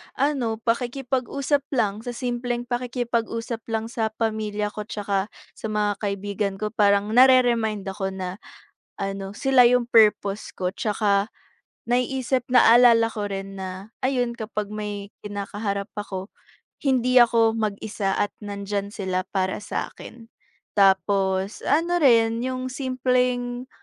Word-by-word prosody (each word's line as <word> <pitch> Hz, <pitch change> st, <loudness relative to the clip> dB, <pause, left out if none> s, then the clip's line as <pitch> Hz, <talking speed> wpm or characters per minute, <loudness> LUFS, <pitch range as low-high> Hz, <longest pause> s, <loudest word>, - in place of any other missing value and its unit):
ano, 275 Hz, -3 st, +1 dB, 0.2 s
pakikipag-usap 265 Hz, +4 st, -1 dB
lang. 210 Hz, -5 st, +1 dB
Sa 245 Hz, -, -4 dB
simpleng 245 Hz, -1 st, -2 dB
pakikipag-usap 240 Hz, -2 st, -3 dB
lang 225 Hz, 0 st, -2 dB
sa 220 Hz, -2 st, -2 dB
pamilya 215 Hz, -2 st, -2 dB
ko 210 Hz, 0 st, -6 dB
tsaka 200 Hz, -2 st, -2 dB, 0.3 s
sa -, -, -8 dB
mga 210 Hz, -1 st, 0 dB
kaibigan 200 Hz, 0 st, -2 dB
ko, 210 Hz, +2 st, -3 dB
parang 205 Hz, -1 st, +2 dB
nare-remind 240 Hz, -4 st, +4 dB
ako 195 Hz, 0 st, -4 dB
na, 185 Hz, 0 st, -5 dB, 0.6 s
ano, 195 Hz, 0 st, -4 dB
sila 260 Hz, +2 st, +4 dB
'yong 245 Hz, 0 st, +3 dB
purpose 210 Hz, -3 st, +3 dB
ko 180 Hz, -1 st, -2 dB
tsaka 205 Hz, -1 st, 0 dB, 0.5 s
naiisip 250 Hz, +1 st, 0 dB
naalala 240 Hz, -2 st, +6 dB
ko 205 Hz, -1 st, -3 dB
rin 195 Hz, 0 st, -5 dB
na, 190 Hz, +3 st, -7 dB
ayun, 250 Hz, -2 st, 0 dB
kapag 215 Hz, -3 st, -5 dB
may 205 Hz, -1 st, -5 dB
kinakaharap 200 Hz, 0 st, -4 dB
ako, 195 Hz, -2 st, -5 dB, 0.5 s
hindi 255 Hz, -2 st, +2 dB
ako 230 Hz, -1 st, +4 dB
mag-isa 210 Hz, -2 st, -2 dB
at 205 Hz, -, 0 dB
nandiyan 200 Hz, -1 st, -4 dB
sila 185 Hz, -3 st, -2 dB
para 190 Hz, -1 st, 0 dB
sa -, -, -3 dB
'kin. 230 Hz, -1 st, -12 dB, 0.5 s
Tapos 195 Hz, 0 st, +2 dB
ano 340 Hz, +3 st, +2 dB
rin, 230 Hz, -4 st, +4 dB
'yong 255 Hz, 0 st, -3 dB
simpleng 250 Hz, -1 st, -1 dB
220 Hz, 125 wpm, -24 LUFS, 200-245 Hz, 0.6 s, naalala